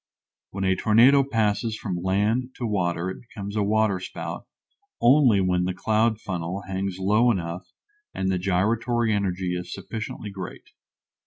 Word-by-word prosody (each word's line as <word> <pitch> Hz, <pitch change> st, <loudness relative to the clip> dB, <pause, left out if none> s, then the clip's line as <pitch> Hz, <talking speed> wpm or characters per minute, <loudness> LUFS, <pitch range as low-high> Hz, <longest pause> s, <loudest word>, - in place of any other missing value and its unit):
When 95 Hz, 0 st, -4 dB
a 95 Hz, 0 st, +2 dB
tornado 120 Hz, +8 st, +5 dB
passes 110 Hz, -3 st, 0 dB
from 90 Hz, -4 st, -4 dB
land 105 Hz, +7 st, 0 dB
to 120 Hz, -, -4 dB
water 90 Hz, -4 st, -1 dB
it -, -, -9 dB
becomes 105 Hz, -4 st, -8 dB
a 105 Hz, -, +1 dB
waterspout 100 Hz, -2 st, -1 dB, 0.5 s
only 120 Hz, -5 st, +5 dB
when 90 Hz, -1 st, +1 dB
the 90 Hz, 0 st, -2 dB
cloud 110 Hz, +2 st, +1 dB
funnel 90 Hz, 0 st, -4 dB
hangs 95 Hz, 0 st, -3 dB
low 105 Hz, +6 st, +3 dB
enough 90 Hz, -4 st, -2 dB, 0.4 s
and 95 Hz, 0 st, -1 dB
the 90 Hz, -, 0 dB
gyratory 110 Hz, +5 st, +1 dB
energy 95 Hz, -3 st, -1 dB
is 90 Hz, 0 st, -6 dB
sufficiently 105 Hz, +2 st, -6 dB
great. 95 Hz, -2 st, -8 dB
100 Hz, 145 wpm, -25 LUFS, 95-110 Hz, 0.5 s, tornado